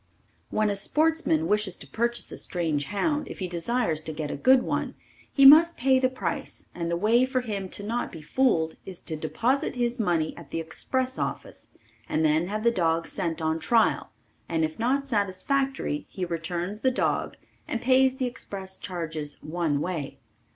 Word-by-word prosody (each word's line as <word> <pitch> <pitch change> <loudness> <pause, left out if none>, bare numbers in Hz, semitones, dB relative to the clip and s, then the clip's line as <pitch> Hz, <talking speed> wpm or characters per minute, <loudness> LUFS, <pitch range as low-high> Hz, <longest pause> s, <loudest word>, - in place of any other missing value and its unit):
When 215 -1 +1
a - - -1
sportsman 300 - +1
wishes 210 -2 +1
to - - -10
purchase 235 - -2
a - - -7
strange 160 -5 -1
hound 295 - -1
if - - -8
he 185 - -3
desires 175 -1 0
to 160 - -5
get 150 -1 -4
a - - -3
good 255 - +5
one - - -2 0.4
he 275 - +5
must 325 +4 +9
pay 260 +1 +4
the 255 0 +2
price 255 - -4
and 170 -1 -3
the 170 - 0
way 225 +6 +4
for 255 0 0
him 200 -5 -4
to 205 - -5
not 230 +4 -2
be 165 - -9
fooled 160 - +1
is 185 -2 -8
to 160 - -5
deposit 235 - 0
his 240 0 -1
money 170 -6 0
at 165 -5 -12
the 165 - -3
express 255 +11 -2
office - - -5 0.4
and 160 +1 +1
then 155 +3 +2
have 215 +2 -3
the 235 - +4
dog 165 -4 +1
sent 165 -4 -3
on 160 +1 0
trial 230 +5 +2 0.4
and 160 -1 +1
if 155 +5 -7
not 260 +4 +1
satisfactory, 250 - -1
he 185 - -4
returns 175 +4 -3
the 260 - +3
dog 255 - -1 0.3
and 235 - -2
pays 260 +1 +4
the 260 - 0
express 195 -6 -5
charges 160 -5 -5
one 155 -2 -1
way. 160 -6 -4
195 Hz, 185 wpm, -26 LUFS, 165-250 Hz, 0.4 s, must